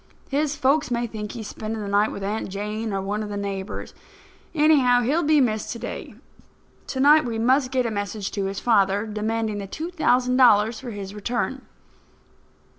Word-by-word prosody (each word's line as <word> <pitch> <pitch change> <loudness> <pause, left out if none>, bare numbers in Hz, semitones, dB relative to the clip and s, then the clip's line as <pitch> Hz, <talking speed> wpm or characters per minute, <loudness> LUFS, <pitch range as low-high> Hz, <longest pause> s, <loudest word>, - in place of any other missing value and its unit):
His 295 +1 0
folks 290 +1 +2
may 240 -1 0
think 210 -2 -6
he's 225 -3 -6
spending 220 +1 -5
the 205 - -5
night 205 +2 +2
with 200 - -6
Aunt 210 +2 -3
Jane 210 +3 -4
or 195 -1 -2
one 205 +2 -2
of 210 - -5
the 205 - -4
neighbours. 200 -1 -5 0.6
Anyhow, 285 -5 +4
he'll 285 +8 +1
be 305 -1 +4
missed 220 -5 0
to - - -7
day. - - -7 0.7
To 260 - -4
night 300 +3 +6
we 235 -2 -3
must 255 +3 +2
get 255 -1 0
a 230 - -1
message 205 -1 -3
to 200 -1 -2
his 195 0 -3
father 205 -3 +2
demanding 215 0 -2
the 200 - -6
two 320 - -5
thousand 250 -6 +2
dollars 225 -3 +5
for 255 - -7
his 200 -3 -7
return." 245 +5 -3
225 Hz, 190 wpm, -24 LUFS, 205-260 Hz, 0.7 s, night